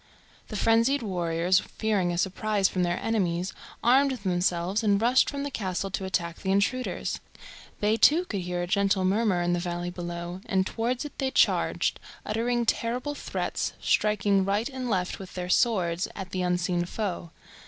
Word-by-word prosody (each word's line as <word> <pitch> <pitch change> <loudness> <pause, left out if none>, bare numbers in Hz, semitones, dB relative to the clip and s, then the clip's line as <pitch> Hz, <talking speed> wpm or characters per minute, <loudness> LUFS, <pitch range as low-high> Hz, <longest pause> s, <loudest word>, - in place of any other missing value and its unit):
The 215 - -7
frenzied 230 +6 +3
warriors, 175 -2 +1
fearing 205 -5 -1
a 175 - -2
surprise 200 +2 +1
from 185 - -2
their 175 0 +1
enemies, 185 -4 0 0.3
armed 265 +4 +5
themselves 185 -2 0
and 205 -2 +3
rushed 245 +4 +4
from 280 -1 -4
the 285 - -4
castle 195 -3 -3
to 195 - -3
attack 170 -3 -2
the 190 - -1
intruders. 200 +6 0 0.6
They, 210 +2 +2
too, 325 +9 +5
could 200 - -3
hear 175 0 -2
a - - -1
gentle 195 0 +2
murmur 195 -2 +2
in 175 0 +1
the 175 - +1
valley 175 0 -3
below, 175 +1 -6
and 190 -1 +1
towards 240 +7 -2
it 295 - -8
they 270 -2 +1
charged, - - +2 0.3
uttering 235 +2 0
terrible 245 +6 -1
threats, - - -3
striking 205 -2 +2
right 205 +5 0
and 260 -2 -4
left 185 -4 -1
with 190 -2 -10
their 180 -1 -4
swords 180 -5 +2
at 190 -2 -7
the 185 - -2
unseen 180 -1 0
foe. 180 -3 -4
195 Hz, 170 wpm, -27 LUFS, 180-225 Hz, 0.6 s, armed